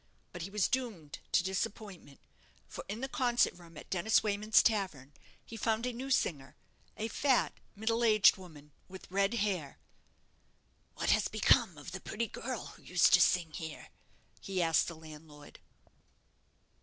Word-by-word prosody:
But 175 Hz, -, -7 dB
he 175 Hz, -, -5 dB
was 205 Hz, 0 st, +1 dB
doomed 215 Hz, -, -4 dB
to -, -, +3 dB
disappointment; 190 Hz, -5 st, -5 dB, 0.5 s
for -, -, -8 dB
in 215 Hz, +4 st, -5 dB
the 265 Hz, -, -2 dB
concert 245 Hz, -3 st, +1 dB
room 170 Hz, -2 st, -15 dB
at -, -, -12 dB
Dennis 190 Hz, +4 st, +2 dB
Wayman's 210 Hz, +1 st, +3 dB
tavern 185 Hz, -, -1 dB, 0.3 s
he 230 Hz, -, -10 dB
found 225 Hz, +1 st, -1 dB
a 250 Hz, -, -2 dB
new 260 Hz, +3 st, -6 dB
singer 140 Hz, -, -1 dB, 0.4 s
a 220 Hz, -, -2 dB
fat, 260 Hz, +3 st, +1 dB, 0.2 s
middle 225 Hz, +3 st, 0 dB
aged 215 Hz, -3 st, +6 dB
woman, 155 Hz, -6 st, -14 dB, 0.2 s
with 190 Hz, -1 st, -12 dB
red 200 Hz, +3 st, +1 dB
hair. 190 Hz, -10 st, -2 dB, 1.2 s
"What -, -, 0 dB
has -, -, +3 dB
become 215 Hz, -, +2 dB
of 145 Hz, -, -9 dB
the 190 Hz, 0 st, -7 dB
pretty 230 Hz, +2 st, -3 dB
girl 240 Hz, +2 st, -5 dB
who -, -, -13 dB
used 180 Hz, -2 st, +3 dB
to 185 Hz, -, +7 dB
sing 170 Hz, -3 st, +3 dB
here?" 160 Hz, -1 st, -8 dB, 0.5 s
he 195 Hz, -2 st, -4 dB
asked 165 Hz, -2 st, +3 dB
the 170 Hz, -, -6 dB
landlord. 155 Hz, -2 st, -13 dB
195 Hz, 155 wpm, -32 LUFS, 165-225 Hz, 1.2 s, to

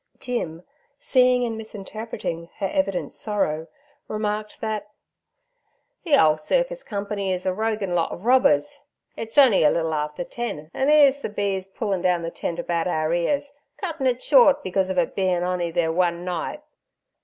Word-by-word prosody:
Jim, 180 Hz, -10 st, -4 dB, 0.3 s
seeing 250 Hz, -2 st, +3 dB
and 230 Hz, -1 st, -3 dB
misinterpreting 215 Hz, -5 st, -6 dB
her 195 Hz, -, -1 dB
evident 190 Hz, -1 st, -1 dB
sorrow, 165 Hz, -7 st, -2 dB, 0.4 s
remarked 215 Hz, 0 st, -3 dB
that, 215 Hz, -2 st, -3 dB, 1.1 s
'The 320 Hz, -5 st, +4 dB
ole 155 Hz, -, +5 dB
cirkis -, -, 0 dB
company 200 Hz, -1 st, -3 dB
is 185 Hz, 0 st, -1 dB
a 185 Hz, -, +1 dB
roguin' 215 Hz, -2 st, -1 dB
lot 170 Hz, -2 st, +1 dB
ov 185 Hz, -, -8 dB
robbers; 235 Hz, -, +3 dB, 0.4 s
it's 225 Hz, +4 st, -6 dB
on'y 260 Hz, -, +6 dB
a 150 Hz, -, +6 dB
little 160 Hz, 0 st, 0 dB
after 150 Hz, +2 st, -2 dB
ten, 175 Hz, -9 st, -6 dB
an' 265 Hz, +2 st, +1 dB
'ere's 285 Hz, -2 st, +6 dB
the -, -, -3 dB
b—s 200 Hz, -2 st, -2 dB
pullin' 195 Hz, -2 st, -2 dB
down 175 Hz, -2 st, +1 dB
the 165 Hz, -, -4 dB
tent 170 Hz, -, -4 dB
about 170 Hz, -1 st, -1 dB
our 155 Hz, -2 st, 0 dB
ears, 280 Hz, +11 st, 0 dB, 0.2 s
cuttin' 325 Hz, -9 st, -2 dB
it 250 Hz, -1 st, 0 dB
short 275 Hz, 0 st, +5 dB
because 190 Hz, 0 st, 0 dB
ov 190 Hz, -, -2 dB
its 175 Hz, -2 st, +1 dB
bein' 185 Hz, -3 st, +1 dB
on'y 180 Hz, -1 st, -1 dB
their 165 Hz, 0 st, 0 dB
one 175 Hz, 0 st, 0 dB
night.' 180 Hz, -, -4 dB
195 Hz, 165 wpm, -24 LUFS, 175-235 Hz, 1.1 s, on'y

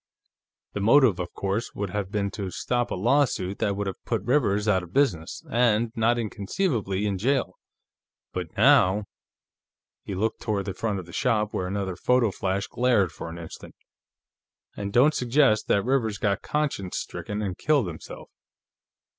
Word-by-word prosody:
The -, -, -3 dB
motive, 115 Hz, -1 st, +5 dB
of 90 Hz, -, -4 dB
course, 100 Hz, +4 st, -3 dB
would 100 Hz, -2 st, -3 dB
have 100 Hz, -1 st, -3 dB
been 100 Hz, -1 st, -1 dB
to 100 Hz, -3 st, -4 dB
stop 120 Hz, +6 st, -1 dB
a -, -, -2 dB
lawsuit 105 Hz, -3 st, +1 dB
that 100 Hz, -3 st, 0 dB
would 100 Hz, -, -2 dB
have 95 Hz, -, -6 dB
put 115 Hz, -5 st, -2 dB
Rivers 110 Hz, -5 st, +1 dB
out 95 Hz, -3 st, +3 dB
of 90 Hz, 0 st, -12 dB
business 95 Hz, -, 0 dB
and, 115 Hz, -1 st, +2 dB
not 115 Hz, +1 st, +2 dB
inconceivably, 105 Hz, -, -1 dB
in 100 Hz, -2 st, -1 dB
jail. 125 Hz, -4 st, 0 dB, 0.7 s
But -, -, -3 dB
now 100 Hz, +3 st, +5 dB, 0.5 s
..." -, -, -68 dB
He 100 Hz, -, -4 dB
looked 110 Hz, +4 st, -1 dB
toward 105 Hz, -4 st, -1 dB
the 95 Hz, -, -3 dB
front 105 Hz, 0 st, -2 dB
of 95 Hz, -, -6 dB
the 85 Hz, -, -13 dB
shop, 110 Hz, -5 st, 0 dB
where 90 Hz, -, -2 dB
another 95 Hz, -1 st, -3 dB
photo 125 Hz, -1 st, +2 dB
flash 95 Hz, +1 st, -2 dB
glared 120 Hz, -8 st, +2 dB
for 85 Hz, -, -7 dB
an 85 Hz, -, -8 dB
instant. 85 Hz, -1 st, -10 dB, 1.0 s
"And 100 Hz, 0 st, -4 dB
don't 135 Hz, +8 st, +5 dB
suggest 125 Hz, -4 st, +2 dB
that 100 Hz, -, +2 dB
Rivers 120 Hz, -5 st, +1 dB
got 100 Hz, -1 st, 0 dB
conscience 140 Hz, -12 st, -2 dB
stricken 105 Hz, +1 st, -4 dB
and 95 Hz, -3 st, -3 dB
killed 145 Hz, -1 st, +2 dB
himself. 80 Hz, -3 st, -9 dB
105 Hz, 170 wpm, -26 LUFS, 95-120 Hz, 1.0 s, motive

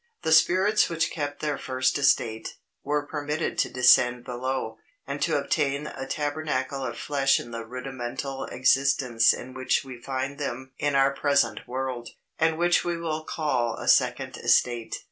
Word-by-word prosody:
The 160 Hz, -, 0 dB
spirits 185 Hz, +6 st, +4 dB
which 165 Hz, -1 st, 0 dB
kept 145 Hz, -2 st, -4 dB
their 150 Hz, -2 st, -2 dB
first 130 Hz, 0 st, 0 dB
estate, 110 Hz, -5 st, +1 dB, 0.3 s
were 145 Hz, +1 st, -1 dB
permitted 150 Hz, +1 st, -3 dB
to -, -, +2 dB
descend 125 Hz, -1 st, +4 dB
below, 125 Hz, -2 st, -4 dB, 0.3 s
and -, -, -5 dB
to -, -, +2 dB
obtain 140 Hz, +1 st, 0 dB
a 135 Hz, -3 st, -6 dB
tabernacle 145 Hz, -2 st, -2 dB
of 120 Hz, -, -4 dB
flesh 135 Hz, -2 st, +2 dB
in 120 Hz, -, -9 dB
the 115 Hz, 0 st, -5 dB
rudimental 130 Hz, +2 st, -5 dB
existence 125 Hz, -2 st, +3 dB
in 130 Hz, +1 st, -6 dB
which 130 Hz, 0 st, 0 dB
we 125 Hz, -3 st, -10 dB
find 135 Hz, +2 st, -4 dB
them 130 Hz, -2 st, -5 dB
in 145 Hz, -1 st, 0 dB
our 135 Hz, 0 st, +4 dB
present 140 Hz, -6 st, +1 dB
world, 130 Hz, -2 st, -4 dB, 0.3 s
and 160 Hz, 0 st, +2 dB
which 175 Hz, +1 st, +3 dB
we 175 Hz, -1 st, -2 dB
will 160 Hz, -2 st, -3 dB
call 130 Hz, -8 st, -1 dB
a -, -, -8 dB
second -, -, +2 dB
estate. 120 Hz, -2 st, +1 dB
135 Hz, 160 wpm, -26 LUFS, 125-150 Hz, 0.3 s, spirits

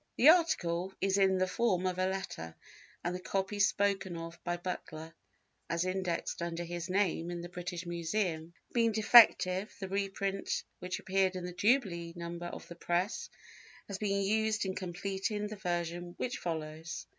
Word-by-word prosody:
The 275 Hz, -, +8 dB
article 190 Hz, -, +3 dB
is 195 Hz, +1 st, +2 dB
in 190 Hz, -1 st, +4 dB
the 185 Hz, -, +3 dB
form 185 Hz, -2 st, +1 dB
of 185 Hz, 0 st, -1 dB
a 185 Hz, -, +2 dB
letter, 190 Hz, -, -4 dB, 0.5 s
and 175 Hz, -, -1 dB
the 180 Hz, -, -3 dB
copy 195 Hz, +2 st, -2 dB
spoken 195 Hz, -2 st, +2 dB
of 165 Hz, 0 st, -8 dB
by 175 Hz, 0 st, -1 dB
Butler, 165 Hz, -2 st, -6 dB, 0.6 s
as 170 Hz, +1 st, 0 dB
indexed 185 Hz, -3 st, -2 dB
under 170 Hz, 0 st, -2 dB
his 175 Hz, +1 st, -5 dB
name 180 Hz, -3 st, +1 dB
in 175 Hz, -1 st, -4 dB
the 175 Hz, -, -7 dB
British 180 Hz, 0 st, -5 dB
Museum, 170 Hz, -1 st, -2 dB, 0.2 s
being 230 Hz, -2 st, +3 dB
defective, 210 Hz, -3 st, +6 dB
the 190 Hz, -, -4 dB
reprint 195 Hz, 0 st, -1 dB, 0.2 s
which 180 Hz, 0 st, -3 dB
appeared 190 Hz, 0 st, +1 dB
in 180 Hz, -1 st, -4 dB
the 180 Hz, -, -5 dB
jubilee 180 Hz, -5 st, +1 dB
number 170 Hz, 0 st, -5 dB
of -, -, -8 dB
the -, -, -8 dB
Press 175 Hz, +5 st, -1 dB, 0.6 s
has 200 Hz, -1 st, -5 dB
been 200 Hz, -2 st, +1 dB
used 220 Hz, +1 st, +1 dB
in 190 Hz, -, -1 dB
completing 195 Hz, +4 st, -3 dB
the 210 Hz, +1 st, -5 dB
version 175 Hz, -2 st, -3 dB
which 250 Hz, +1 st, -2 dB
follows. 160 Hz, -1 st, -4 dB
185 Hz, 165 wpm, -32 LUFS, 175-200 Hz, 0.6 s, The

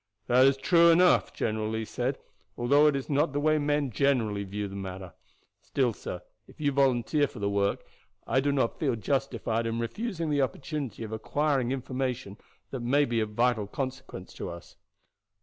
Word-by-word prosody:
"That 125 Hz, +3 st, +5 dB
is 135 Hz, 0 st, +3 dB
true 170 Hz, +4 st, +5 dB
enough," 180 Hz, +2 st, +5 dB
General 110 Hz, -1 st, -2 dB
Lee 110 Hz, 0 st, -2 dB
said, 125 Hz, +5 st, -2 dB, 0.4 s
"although 140 Hz, +5 st, +4 dB
it 150 Hz, -, +3 dB
is 135 Hz, -, -3 dB
not 145 Hz, +1 st, +1 dB
the 145 Hz, -, 0 dB
way 155 Hz, +1 st, +3 dB
men 145 Hz, -2 st, 0 dB
generally 115 Hz, -6 st, +1 dB
view 100 Hz, +1 st, -4 dB
the 100 Hz, -, -9 dB
matter. 95 Hz, -2 st, -7 dB, 0.5 s
Still, 125 Hz, -4 st, 0 dB
sir, 90 Hz, -3 st, -7 dB, 0.2 s
if -, -, -18 dB
you 145 Hz, -2 st, +1 dB
volunteer 135 Hz, +1 st, +2 dB
for 140 Hz, -, -13 dB
the 100 Hz, -1 st, -1 dB
work, 100 Hz, 0 st, 0 dB, 0.4 s
I 130 Hz, -, +2 dB
do 140 Hz, +2 st, +1 dB
not 130 Hz, -4 st, 0 dB
feel 135 Hz, -6 st, +1 dB
justified 115 Hz, -1 st, -1 dB
in 115 Hz, 0 st, -2 dB
refusing 165 Hz, -, -3 dB
the 145 Hz, -1 st, +2 dB
opportunity 135 Hz, -2 st, -3 dB
of 110 Hz, -, -7 dB
acquiring 135 Hz, +2 st, 0 dB
information 130 Hz, -5 st, -3 dB, 0.3 s
that 135 Hz, -, -4 dB
may 135 Hz, +5 st, +2 dB
be 120 Hz, -3 st, 0 dB
of 110 Hz, -1 st, -2 dB
vital 120 Hz, -3 st, +2 dB
consequence 130 Hz, -5 st, -6 dB
to -, -, -6 dB
us. 85 Hz, 0 st, -10 dB
130 Hz, 180 wpm, -28 LUFS, 110-145 Hz, 0.5 s, That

